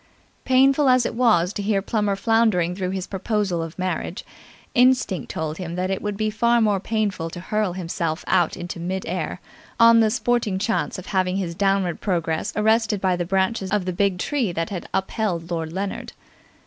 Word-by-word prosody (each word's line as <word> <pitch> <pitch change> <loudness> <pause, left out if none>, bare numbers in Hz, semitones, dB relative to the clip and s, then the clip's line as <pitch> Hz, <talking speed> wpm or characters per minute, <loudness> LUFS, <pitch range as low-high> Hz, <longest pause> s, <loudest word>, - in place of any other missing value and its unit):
Painful 270 +2 +4
as 255 -1 +4
it - - -2
was 215 -7 +3
to 210 - -3
hear 200 0 +1
Plummer 205 0 0
floundering 200 -5 +2
through 185 -1 -2
his 190 -1 -3
proposal 195 -3 -1
of 165 -1 -7
marriage, 185 +1 -3 0.5
instinct 250 - +2
told 160 +1 -4
him 175 -2 -5
that 185 +1 -1
it 190 - -2
would 205 -1 -3
be 215 0 0
far 235 +2 +2
more 210 -3 +2
painful 205 -5 -2
to 175 - -8
hurl 210 +1 -1
himself 170 -2 -3
out 175 -3 +2
into 175 0 -6
mid 185 +2 -3
air - - -3 0.4
on 230 0 +7
the 220 -1 +4
sporting 230 -3 0
chance 225 +2 -1
of 185 - -8
having 185 -1 0
his 180 -4 -2
downward 195 -2 0
progress 165 -5 -1
arrested 220 0 +2
by 185 -1 +1
the 175 0 -2
branches 190 +2 0
of 205 -2 0
the 185 - -2
big 195 0 +1
tree 240 +1 -1
that 165 +1 -3
had 180 -4 -5
upheld 185 -4 -2
Lord 165 -2 -2
Leonard. 195 +3 -4
195 Hz, 185 wpm, -23 LUFS, 175-220 Hz, 0.5 s, on